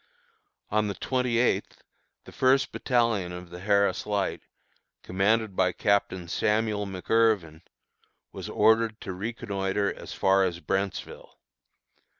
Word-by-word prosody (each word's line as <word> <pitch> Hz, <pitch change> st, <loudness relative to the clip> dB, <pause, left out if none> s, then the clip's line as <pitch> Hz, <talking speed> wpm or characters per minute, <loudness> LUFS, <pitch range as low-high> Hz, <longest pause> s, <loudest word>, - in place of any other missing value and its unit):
On 105 Hz, 0 st, +2 dB
the 100 Hz, -, -3 dB
twenty 125 Hz, -2 st, -1 dB
eighth 120 Hz, -, 0 dB, 0.4 s
the -, -, -13 dB
first 130 Hz, +1 st, +2 dB
battalion 115 Hz, -8 st, 0 dB
of 90 Hz, 0 st, -9 dB
the 90 Hz, -, -8 dB
Harris 100 Hz, +2 st, +1 dB
Light, 100 Hz, -2 st, -1 dB, 0.6 s
commanded 100 Hz, +2 st, +1 dB
by 90 Hz, -1 st, +2 dB
Captain 95 Hz, -3 st, 0 dB
Samuel 105 Hz, +2 st, 0 dB
McIrvin, 95 Hz, -4 st, +1 dB, 0.7 s
was -, -, -7 dB
ordered 110 Hz, 0 st, +3 dB
to 95 Hz, -, -5 dB
reconnoitre 100 Hz, -1 st, -2 dB
as -, -, -10 dB
far 95 Hz, 0 st, +3 dB
as 90 Hz, -2 st, -1 dB
Brentsville. 95 Hz, +1 st, -4 dB
100 Hz, 120 wpm, -27 LUFS, 95-110 Hz, 0.7 s, ordered